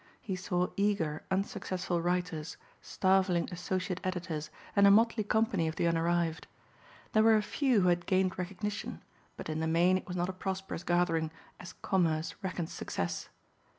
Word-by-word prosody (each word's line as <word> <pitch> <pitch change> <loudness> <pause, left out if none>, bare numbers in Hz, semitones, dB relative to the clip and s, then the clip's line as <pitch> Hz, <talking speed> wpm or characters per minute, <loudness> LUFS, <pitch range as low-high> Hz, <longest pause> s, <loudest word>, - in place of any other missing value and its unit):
He 190 - -4
saw 180 -1 -1
eager 195 -7 +1
unsuccessful 190 -2 -1
writers, 175 -2 -2 0.2
starveling 185 -2 +2
associate 185 +1 -2
editors 175 -5 -3 0.3
and 200 -1 +7
a - - +8
motley 225 +2 +4
company 205 -5 +1
of 160 - -3
the - - 0
unarrived. 170 0 +1 0.7
There 215 - +5
were 220 0 +6
a 215 - +2
few 255 -1 +2
who 180 - +4
had 175 0 +1
gained 185 -1 +1
recognition 200 +3 -4 0.3
but - - -6
in 155 0 -2
the 160 - 0
main 175 +3 +4
it - - -15
was 180 -1 -4
not 175 0 0
a 190 - -4
prosperous 190 -2 -4
gathering 170 -2 +1 0.3
as 180 - -9
commerce 165 -4 +1
reckons 185 -4 -3
success. 85 0 -3
180 Hz, 160 wpm, -31 LUFS, 170-195 Hz, 0.7 s, a